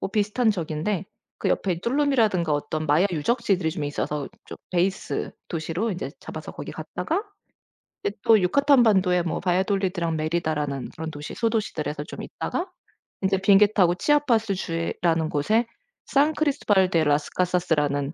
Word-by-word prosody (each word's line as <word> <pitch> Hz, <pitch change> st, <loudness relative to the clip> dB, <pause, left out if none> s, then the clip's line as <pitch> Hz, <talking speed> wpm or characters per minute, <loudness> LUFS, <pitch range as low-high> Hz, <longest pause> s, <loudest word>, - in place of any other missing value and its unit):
뭐 -, -, -3 dB
비슷한 215 Hz, +3 st, +2 dB
저기인데 175 Hz, +1 st, -2 dB, 0.3 s
그 -, -, -1 dB
옆에 180 Hz, -4 st, 0 dB
똘룸이라든가 235 Hz, -, +2 dB
어떤 150 Hz, +2 st, -2 dB
마야 155 Hz, +6 st, +4 dB
유적지들이 185 Hz, -, 0 dB
좀 155 Hz, -2 st, -4 dB
있어서 145 Hz, 0 st, -3 dB, 0.2 s
저 -, -, -8 dB
베이스 185 Hz, +2 st, -1 dB, 0.2 s
도시로 170 Hz, +6 st, -2 dB
인제 185 Hz, -1 st, -4 dB
잡아서 -, -, -8 dB
거기 -, -, -7 dB
갔다가 340 Hz, +6 st, -3 dB, 0.8 s
이제 200 Hz, -, -2 dB
또 225 Hz, -1 st, +6 dB
유카탄 270 Hz, +8 st, +4 dB
반도에 190 Hz, -5 st, +3 dB
뭐 170 Hz, -, -2 dB
바이아돌리드랑 185 Hz, -2 st, 0 dB
메리다라는 155 Hz, -4 st, -2 dB
그런 160 Hz, 0 st, -6 dB
도시 145 Hz, 0 st, -7 dB
소도시들에서 160 Hz, -11 st, -2 dB
좀 -, -, -8 dB
있다가 360 Hz, +2 st, -4 dB, 0.5 s
이제 190 Hz, 0 st, +2 dB
비행기 200 Hz, +2 st, +5 dB
타고 180 Hz, -4 st, +4 dB
치아파스 230 Hz, -4 st, +2 dB
주에라는 165 Hz, -2 st, -1 dB
곳에 215 Hz, +12 st, +1 dB, 0.4 s
산크리스토발 285 Hz, -10 st, +2 dB
대 165 Hz, -2 st, +3 dB
라스카사스라는 150 Hz, -2 st, 0 dB
180 Hz, 375 characters per minute, -25 LUFS, 160-215 Hz, 0.8 s, 또